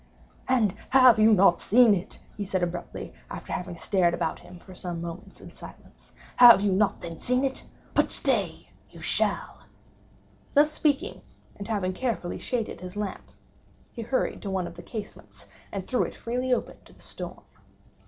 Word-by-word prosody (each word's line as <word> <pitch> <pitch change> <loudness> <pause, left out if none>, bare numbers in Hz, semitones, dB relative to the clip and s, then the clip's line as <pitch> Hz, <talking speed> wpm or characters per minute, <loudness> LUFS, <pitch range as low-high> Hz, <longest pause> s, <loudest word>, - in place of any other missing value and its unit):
"And 235 -6 +3
you - - -18
have 255 -4 +7
not 200 -5 +5
seen 235 0 +5
it?" 180 -2 -3 0.2
he 210 - -4
said 190 -2 -1
abruptly, 175 0 -5 0.2
after - - -7
having 180 -1 -4
stared 175 -1 +1
about 160 - -2
him 180 - -13
for 185 +2 -14
some 175 -2 -5
moments 170 +1 -8
in - - -12
silence—"you - - -15 0.2
have 240 -5 +9
not 200 0 +1
then 165 -2 -7
seen 250 +2 +1
it?—but, 265 -1 -2
stay! - - 0 0.2
you - - -14
shall." - - -1 1.0
Thus 295 +2 +5
speaking, 305 +5 0 0.3
and 200 - -8
having 200 -5 -1
carefully 225 -5 -3
shaded 230 -7 -3
his 180 +1 -8
lamp, 205 -2 -5 0.6
he 235 - -7
hurried 245 +4 -1
to 200 - -5
one 190 -2 -1
of 175 - -8
the 175 - -9
casements, 215 +1 -9 0.3
and 195 -2 -5
threw 250 - 0
it - - -2
freely 250 +2 -3
open 250 - -1
to - - -18
the - - -21
storm. - - -8
205 Hz, 165 wpm, -26 LUFS, 180-245 Hz, 1.0 s, have